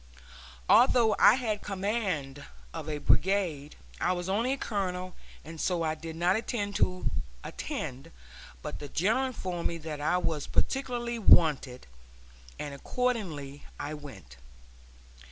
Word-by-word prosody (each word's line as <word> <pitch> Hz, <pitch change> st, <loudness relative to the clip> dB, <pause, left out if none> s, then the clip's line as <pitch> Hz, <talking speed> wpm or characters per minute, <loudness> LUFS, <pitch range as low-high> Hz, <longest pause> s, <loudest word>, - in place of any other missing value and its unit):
Although 235 Hz, -2 st, +6 dB
I -, -, +8 dB
had 220 Hz, -5 st, -2 dB
command 190 Hz, -, -2 dB, 0.3 s
of 160 Hz, -2 st, -5 dB
a 150 Hz, -, -2 dB
brigade, 165 Hz, -3 st, +1 dB, 0.2 s
I -, -, +2 dB
was 175 Hz, 0 st, -4 dB
only 230 Hz, +6 st, +1 dB
a -, -, -3 dB
colonel, 185 Hz, -5 st, -3 dB, 0.3 s
and 160 Hz, 0 st, -7 dB
so 175 Hz, -3 st, +1 dB
I 155 Hz, -1 st, +1 dB
did 160 Hz, 0 st, -7 dB
not 175 Hz, +3 st, +2 dB
intend 210 Hz, -3 st, -2 dB
to 185 Hz, 0 st, +1 dB, 0.3 s
attend, 130 Hz, +1 st, -5 dB, 0.5 s
but -, -, -5 dB
the 145 Hz, -, -6 dB
General 220 Hz, -, +2 dB
informed 185 Hz, -8 st, -3 dB
me 170 Hz, -, -4 dB
that 155 Hz, -2 st, -6 dB
I 165 Hz, +4 st, +2 dB
was 160 Hz, -5 st, -2 dB
particularly 240 Hz, -3 st, -1 dB
wanted, 150 Hz, -, +4 dB, 0.7 s
and 145 Hz, -1 st, -5 dB
accordingly 155 Hz, -, -2 dB, 0.2 s
I 145 Hz, +1 st, -4 dB
went. 135 Hz, -, -10 dB
180 Hz, 135 wpm, -29 LUFS, 150-215 Hz, 0.7 s, I